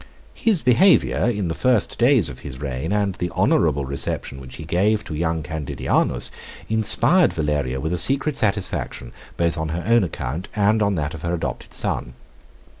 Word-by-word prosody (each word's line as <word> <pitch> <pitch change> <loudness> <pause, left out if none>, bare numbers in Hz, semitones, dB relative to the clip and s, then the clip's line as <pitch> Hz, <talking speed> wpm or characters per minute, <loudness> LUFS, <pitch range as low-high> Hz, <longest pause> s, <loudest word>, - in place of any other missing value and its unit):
His 210 -8 +1
behavior, 130 0 +4
in 105 -6 -2
the 80 - -2
first 125 +1 0
days 120 - +4
of 65 -3 -8
his 65 -2 -8
reign, 70 +3 -4
and 100 -2 0
the 90 0 -3
honorable 70 0 +2
reception 70 0 -3
which 65 -1 -10
he 80 - -8
gave 100 +7 +1
to - - -7
young 80 0 -1
Candidianus, 75 -1 -1 0.4
inspired 110 - +4
Valeria 75 -4 -1
with 80 +5 -2
a 90 - 0
secret 140 - +1
satisfaction, 100 - -2 0.3
both 85 -1 0
on 80 0 -2
her 85 +2 -3
own 115 0 +4
account 80 0 -4
and 105 +1 +2
on 100 -1 +1
that 75 -1 -2
of 80 - -8
her 85 +1 -1
adopted 80 - -5
son. - - -2
85 Hz, 175 wpm, -22 LUFS, 75-110 Hz, 0.4 s, behavior